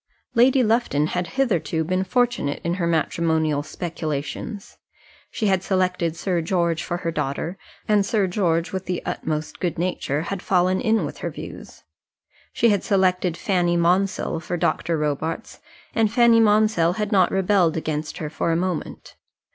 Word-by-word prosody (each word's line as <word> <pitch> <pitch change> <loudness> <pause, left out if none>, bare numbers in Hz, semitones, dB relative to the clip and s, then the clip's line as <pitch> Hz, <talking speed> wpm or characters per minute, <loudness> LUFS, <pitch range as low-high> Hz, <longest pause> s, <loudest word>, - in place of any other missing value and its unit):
Lady 255 +2 +5
Lufton 220 -10 +2
had 180 +2 -2
hitherto 175 - +1
been 185 +3 0
fortunate 240 - 0
in 170 - 0
her 170 - +1
matrimonial 160 -2 +1
speculations. 160 +6 -5 0.5
She 220 - -3
had 190 -3 +2
selected 180 -3 0
Sir 175 0 -1
George 170 -1 0
for 175 - -3
her 170 -1 -3
daughter, 160 +3 -3 0.3
and 210 -1 +4
Sir 200 0 +1
George, 175 -3 0
with 190 0 -4
the 180 -1 -3
utmost 155 0 -3
good 175 -3 -2
nature, 160 -4 -1
had 190 +1 -4
fallen 185 0 +2
in 225 -3 +2
with - - -7
her - - -3
views. - - -10 0.7
She 235 - +3
had 205 -2 +1
selected 185 -3 +1
Fanny 175 -3 +1
Monsell 180 +1 +1
for 175 +1 -4
Mr. 165 -1 0
Robarts, 150 +7 -3 0.3
and 220 -2 +2
Fanny 235 -1 +5
Monsell 210 -5 +3
had 210 +1 -3
not 190 -4 +4
rebelled 190 -4 +2
against 155 -1 -3
her 150 -2 -5
for 165 - -1
a - - +2
moment. 180 -1 -4
180 Hz, 155 wpm, -23 LUFS, 165-200 Hz, 0.7 s, Lady